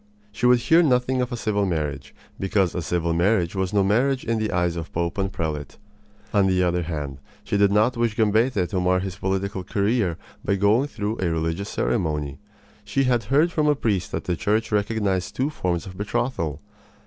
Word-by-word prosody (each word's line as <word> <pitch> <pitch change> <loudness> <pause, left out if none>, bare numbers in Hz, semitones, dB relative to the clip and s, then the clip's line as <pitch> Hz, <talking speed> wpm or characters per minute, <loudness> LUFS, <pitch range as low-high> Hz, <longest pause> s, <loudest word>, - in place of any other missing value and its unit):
She 120 +4 0
would 125 0 +6
hear 165 +6 +5
nothing 130 -3 +2
of 125 +1 -2
a 120 - -3
civil 105 -3 0
marriage, 75 -7 -3 0.2
because 95 -2 +1
a 90 - -2
civil 85 +1 -1
marriage 85 0 +2
was 95 -1 -1
no 100 -2 +3
marriage 125 +7 +1
in 115 -1 0
the 110 -1 -1
eyes 90 -1 0
of 85 -1 -6
Pope 85 +3 -2
and 95 0 -1
prelate. 75 -5 -4 0.6
On 100 -2 +4
the 90 -1 +2
other 90 0 +1
hand, 75 -5 -4 0.2
she - - -2
did 100 -1 +4
not 110 +5 +3
wish 115 -2 0
Gambetta 110 -2 +2
to 95 - -1
mar 90 0 +2
his 95 0 -5
political 95 -1 -2
career 100 -3 0 0.3
by 100 - +1
going 105 +8 +3
through 110 -4 -4
a 90 - 0
religious 80 +5 -2
ceremony. 75 - -1 0.4
She 105 +7 0
had 120 -4 +1
heard 150 +9 +3
from 155 -3 +1
a 150 - +4
priest 105 -9 -1
that - - -3
the 90 - -1
Church 110 +6 0
recognized 105 -3 0
two 135 +4 0
forms 90 - -2
of 95 -2 -9
betrothal. 100 - -2
100 Hz, 195 wpm, -24 LUFS, 90-115 Hz, 0.6 s, would